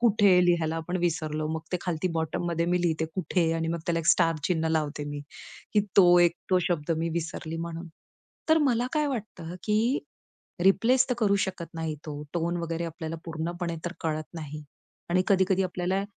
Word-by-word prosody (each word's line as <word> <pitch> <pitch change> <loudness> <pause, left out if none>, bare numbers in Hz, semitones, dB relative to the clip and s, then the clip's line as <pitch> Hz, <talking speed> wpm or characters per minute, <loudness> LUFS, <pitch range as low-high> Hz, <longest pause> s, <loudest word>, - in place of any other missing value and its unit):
कुठे 205 -5 +5
लिहायला 165 -2 +2
आपण 165 +3 -3
विसरलो. 155 -3 -1
मग 160 - -3
ते - - +3
खालती 175 0 -1
बॉटममध्ये 170 +1 -1
मी 180 0 +2
लिहिते, 160 -2 +1
कुठे? 175 -2 +1
आणि 165 0 -1
मग 170 +1 -1
त्याला 170 -1 +1
एक 160 - -4
स्टार 165 -2 +4
चिन्ह 165 -2 +1
लावते 150 -2 -1
मी. 145 0 -5 0.5
की 210 - +6 0.2
तो 175 -2 +8
एक, 175 -1 +5 0.2
तो 185 - +5
शब्द 170 -3 -1
मी 165 +1 0
विसरली 165 0 -5
म्हणून. 165 +1 -5 0.6
तर 315 0 +6
मला 240 0 +1
काय 300 -1 +2
वाटतं, 210 - -5
की 225 +6 +2 0.7
रिप्लेस 245 +7 +4
तर - - +3
करू 205 -3 +3
शकत 170 -3 -7
नाही 160 -1 -2
तो, 150 -1 -5
टोन 170 0 -1
वगैरे 165 0 -2
आपल्याला 165 0 -5
पूर्णपणे 170 +1 -3
तर 175 - -2
कळत 155 -2 -1
नाही. 150 -2 -6 0.5
आणि 180 +1 +3
कधी-कधी 190 -1 +3
आपल्याला 185 +1 -1
170 Hz, 180 wpm, -27 LUFS, 160-185 Hz, 0.7 s, तो